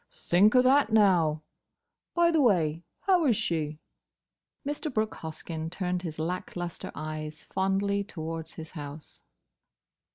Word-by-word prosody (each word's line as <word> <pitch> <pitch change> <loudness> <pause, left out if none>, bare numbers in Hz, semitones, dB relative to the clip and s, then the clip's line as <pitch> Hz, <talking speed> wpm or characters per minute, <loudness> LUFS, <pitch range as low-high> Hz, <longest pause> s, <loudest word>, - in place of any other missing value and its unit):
"Think 200 +7 +5
o' 250 - +7
that, 265 -2 +4
now!—By 190 - +1
the 320 -2 +3
way, 170 - +3 0.2
how 370 -3 +3
is 235 - +4
she?" 155 -5 -1 0.9
Mr. 295 +2 -2
Brooke 220 -2 0
Hoskyn 160 0 -5
turned 180 0 -2
his 165 -4 -5
lack 170 +4 -3
lustre 175 -1 -5
eyes 155 0 -5
fondly 200 +1 0
towards 160 -3 -6
his 160 0 -8
house. 145 -1 -9
175 Hz, 125 wpm, -28 LUFS, 160-215 Hz, 0.9 s, o